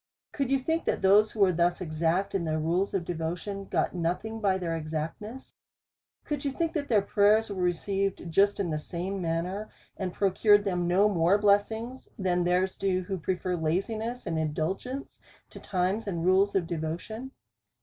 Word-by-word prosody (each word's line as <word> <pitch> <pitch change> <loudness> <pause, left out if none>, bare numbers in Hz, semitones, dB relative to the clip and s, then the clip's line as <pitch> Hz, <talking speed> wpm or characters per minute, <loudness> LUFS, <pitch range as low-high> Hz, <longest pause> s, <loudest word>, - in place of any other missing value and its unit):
Could 275 -3 -2
you 275 - +3
think, 320 +5 -1
that - - -1
those 205 +3 +6
who 215 - -5
were 190 -2 +6
thus 175 +1 +1
exact 170 +3 0
in 195 -3 0
their 155 -1 -1
rules 175 +6 0
of 180 -3 -1
devotion, 175 +4 -4
got - - 0
nothing 180 +6 -2
by 195 -3 +2
their 170 -3 -2
exactness? 165 +10 -5 0.7
Could 290 -2 -3
you 285 - 0
think, 330 +3 -1
that 290 -3 -2
their 215 -6 +3
prayers 210 +2 +3
were 190 -2 -3
received 195 +2 -1
just 200 +5 +3
in 180 -5 -1
the 155 - -1
same 185 +5 -4
manner, 175 +5 -2 0.3
and 190 -2 -3
pro 195 +1 +1
cured 205 +1 +5
them 180 -3 -1
no 190 +4 +4
more 180 -1 +3
blessings, 220 +5 +1
than 180 -2 +1
theirs 180 +2 +1
do, 190 -1 +1
who 190 0 -4
prefer 180 +2 -1
laziness 215 +9 -2
and 165 -1 -1
indulgence 180 - -3 0.3
to - - -10
times 190 +4 -1
and 170 -4 -2
rules 190 +2 +3
of 185 -3 +2
devotion 170 +10 -4
190 Hz, 180 wpm, -28 LUFS, 170-210 Hz, 0.7 s, those